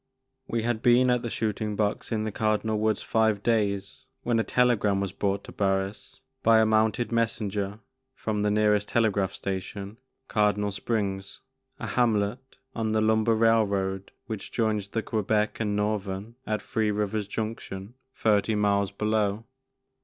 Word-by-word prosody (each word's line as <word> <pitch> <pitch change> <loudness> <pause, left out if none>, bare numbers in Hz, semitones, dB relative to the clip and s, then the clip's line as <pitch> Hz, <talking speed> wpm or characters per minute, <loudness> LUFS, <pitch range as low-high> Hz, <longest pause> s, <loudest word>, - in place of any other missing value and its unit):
WE 115 -1 -1
had 115 -1 -1
been 125 +1 +5
at 125 -1 +2
the 120 - -3
shooting 110 -1 -2
box 105 +2 -1
in 110 -1 0
the 110 - -2
Cardinal 110 +1 0
Woods 110 -1 +1
five 110 -3 +1
days 105 -4 0 0.2
when 120 -1 +1
a - - +2
tele 125 +1 +3
gram 100 -2 +1
was 100 -1 -2
brought 100 0 -1
to - - -10
Barris 95 0 -2 0.2
by 115 0 +5
a 110 - +5
mounted 110 +2 +2
messenger 105 -3 -1 0.4
from 105 -2 -2
the 105 - +2
nearest 105 -1 +2
telegraph 105 -5 +1
station, 100 +2 -5 0.3
Cardinal 105 -1 +1
Springs, 100 -2 -3 0.4
a - - -5
hamlet 120 +2 0 0.2
on 110 -1 -1
the 110 - +2
lumber 110 +1 +3
railroad 100 -4 +1
which 110 -3 -6
joins 110 -3 0
the 110 +2 -2
Quebec 105 0 0
and 105 -2 0
Northern 105 0 -2
at 110 0 -1
Three 110 -1 0
Rivers 105 0 -1
Junction, 105 -1 -5 0.2
thirty 110 0 +2
miles 100 -1 +2
below. 105 +1 0
105 Hz, 155 wpm, -27 LUFS, 100-110 Hz, 0.4 s, been